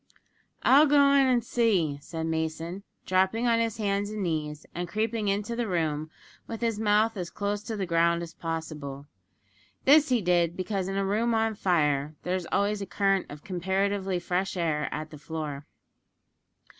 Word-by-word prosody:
"I'll 290 +4 +7
go 280 -1 +5
in 275 -1 +5
an' 250 -2 +3
see," 195 -12 +1
said 160 +2 -5
Mason, 160 +3 -3 0.2
dropping 190 +5 +2
on 230 -1 +3
his 230 -1 -1
hands 205 -1 -1
and 215 -1 -4
knees, 155 -3 -3
and 175 +1 -3
creeping 215 +1 -1
into 205 +3 -1
the 235 -1 -1
room 155 -4 -1 0.4
with 225 0 -6
his 230 -3 0
mouth 215 +1 +3
as 175 -2 -4
close 205 0 -2
to 225 -2 -4
the 195 - -1
ground 170 0 +2
as 165 - -9
possible. 155 -4 -5 0.8
This 295 +1 +6
he 250 -2 +3
did, 175 -1 +2
because 190 0 -2
in 195 0 -2
a 195 - +1
room 225 +4 +1
on 225 0 +1
fire 150 -7 +1
there 180 +1 -1
is 180 -3 -4
always 205 +1 +1
a 195 - -4
current 195 -2 +1
of 145 0 -10
comparatively 190 0 -1
fresh 180 +2 -2
air 155 -3 0
at 155 0 -5
the 150 - -10
floor. 150 -2 -5
190 Hz, 175 wpm, -27 LUFS, 165-215 Hz, 0.8 s, I'll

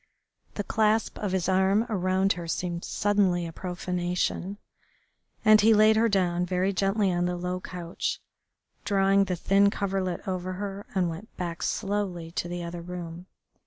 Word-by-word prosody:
The 205 - -2
clasp 220 +1 +1
of 205 -3 -2
his 185 -2 0
arms 190 +3 +3
around 190 -2 +1
her 170 -1 -7
seemed 170 +1 -3
suddenly 200 -4 +1
a 165 - -7
profanation, 180 +2 -2 0.9
and 215 0 +7
he 220 +1 +6
laid 215 +1 +6
her 230 +1 +3
down 180 -3 +1
very 185 +2 0
gently 195 0 +1
on 175 0 +1
the 180 0 -1
low 180 +1 -3
couch, 175 -2 -4 0.6
drawing 195 0 +3
the 185 - -1
thin 195 +3 +3
coverlet 195 -3 -2
over 185 -1 -2
her, 200 +1 -5
and 185 -2 +2
went 170 +7 -8
back 170 -1 -4
slowly 195 -5 -2
to 175 - -3
the 175 0 -4
other 170 0 -6
room. 175 0 -7
185 Hz, 160 wpm, -27 LUFS, 175-200 Hz, 0.9 s, and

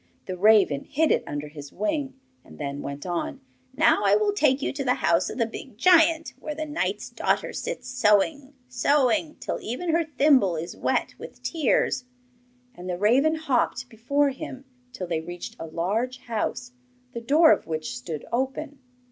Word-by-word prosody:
The 185 - -4
raven 195 -7 +4
hid 315 +2 +1
it - - +2
under 145 +1 -4
his 145 -1 -10
wing, 270 +4 -2 0.2
and - - -15
then 140 -1 -4
went 140 +3 -6
on; 260 - -3 0.4
'Now 315 +4 +4
I - - +5
will 420 -1 +2
take 290 -9 +3
you - - -2
to 275 0 -3
the 250 -1 +2
house 170 +1 +2
of - - -7
the 230 - +2
big 225 0 -9
giant, 325 +2 +4
where 300 - -5
the 310 +1 -3
knight's 300 +1 -3
daughter - - -1
sits 250 - -5
sewing, 255 +4 +1
sewing, 285 +5 +1
till - - -3
even 290 +10 -3
her 335 +1 +2
thimble 275 - +3
is 165 +2 -5
wet - - -1
with - - -11
tears.' 290 -5 +1 0.7
And 180 -4 -9
the 175 - -2
raven 260 - +3
hopped 250 -4 -1
before 280 +5 +1
him 270 -1 -8 0.3
till 190 -6 -5
they 165 -2 -2
reached 175 +2 -8
a 165 - -6
large 210 +11 -2
house, 240 +2 -3 0.4
the 235 - -5
door 305 +7 +5
of - - +1
which 160 +9 -4
stood 170 -12 -6
open. 270 +3 -2
250 Hz, 175 wpm, -25 LUFS, 185-295 Hz, 0.7 s, I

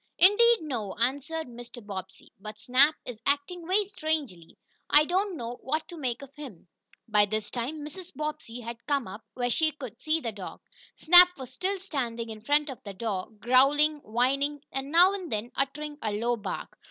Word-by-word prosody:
"Indeed, 450 +4 +6
no," 235 -10 -4
answered 285 +7 -1
Mr. 240 -1 -10
Bobbsey. 190 -2 -8
"But 215 +1 -8
Snap 260 +6 +4
is 235 -3 -7
acting 305 +6 -1
very 400 +3 +3
strangely. 310 - -3 0.3
I 300 +1 +6
don't 375 +2 0
know 240 -1 -6
what 310 +4 -2
to 350 - -8
make 260 -4 -3
of 275 0 -12
him." 265 - -10 0.4
By 210 -2 +4
this 215 0 -3
time 290 +5 -4
Mrs. 360 +4 -9
Bobbsey 300 -6 -5
had 235 0 -7
come 280 -6 0
up, 200 +4 -8
where 245 -1 -1
she 315 +5 +3
could 255 -6 -9
see 310 +1 +1
the 235 -7 -3
dog. 200 -3 -9 0.3
Snap 355 +2 +8
was 260 -2 -8
still 380 +9 -2
standing 235 -10 -3
in 215 -1 -9
front 290 +4 +2
of 260 - -10
the 200 -2 -8
door, 195 -3 -3
growling, 275 +7 +4
whining, 275 +4 0
and, 270 +1 -4
now 355 +4 +6
and 375 -4 -5
then, 215 +3 -3
uttering 295 +2 -3
a 215 - -1
low 235 +3 0
bark. 220 - -6
270 Hz, 185 wpm, -28 LUFS, 230-310 Hz, 0.4 s, Snap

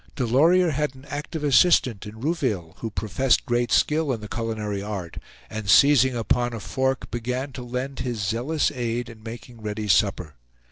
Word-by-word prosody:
Delorier 160 +9 +3
had 150 -1 -1
an 130 +1 -15
active 150 +2 -5
assistant 130 - +4
in 110 +1 -10
Rouville, 125 - -1
who 115 - -4
professed 110 +5 +1
great 120 -2 0
skill 155 -1 +2
in 120 - -2
the 105 - -8
culinary 110 -3 -3
art, 100 -5 -6 0.3
and 110 -2 -6
seizing 130 -1 +6
upon 120 +1 0
a 115 - -4
fork, 130 +4 -2
began 125 +3 -3
to 130 - -8
lend 125 +3 -4
his 120 -3 -3
zealous 120 +12 0
aid 120 -2 -3
in 110 -2 -13
making 115 +1 -10
ready 105 0 -4
supper. 95 -5 +2
120 Hz, 170 wpm, -24 LUFS, 110-135 Hz, 0.3 s, seizing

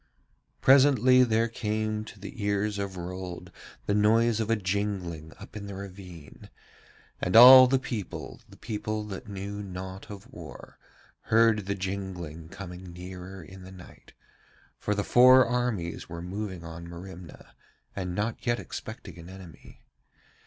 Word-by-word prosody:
Presently 130 -2 +6
there 115 -1 +2
came 110 -1 -2
to 110 - -12
the 105 +3 -8
ears 100 0 0
of 100 -2 -4
Rold 90 0 -7 0.3
the 100 - 0
noise 110 +2 +3
of 110 -1 -2
a 115 - +4
jingling 95 -5 -3
up - - -12
in 100 -1 -6
the 100 - -7
ravine, 90 -5 -11 0.7
and 90 - -1
all 130 +2 +11
the 135 +1 +3
people, 115 -6 -6
the - - -15
people 105 0 -4
that 105 +3 -8
knew 100 +1 -5
naught 95 0 -8
of 100 -2 -9
war, - - -11 0.5
heard 110 -3 +3
the 100 - -1
jingling 95 -5 -5
coming 90 -1 -9
nearer 90 +1 -9
in 95 +4 -12
the 95 +1 -11
night; 95 -2 -15 0.7
for 105 - -1
the 100 - -1
four 130 +2 +7
armies 120 -11 -2
were 85 0 -7
moving 95 -1 -5
on 85 +1 -8
Merimna 85 -1 -11 0.4
and 90 -2 -4
not 110 +3 -2
yet 120 0 +2
expecting 90 -6 -8
an 85 +2 -11
enemy. 95 -3 -13
100 Hz, 145 wpm, -28 LUFS, 90-110 Hz, 0.7 s, all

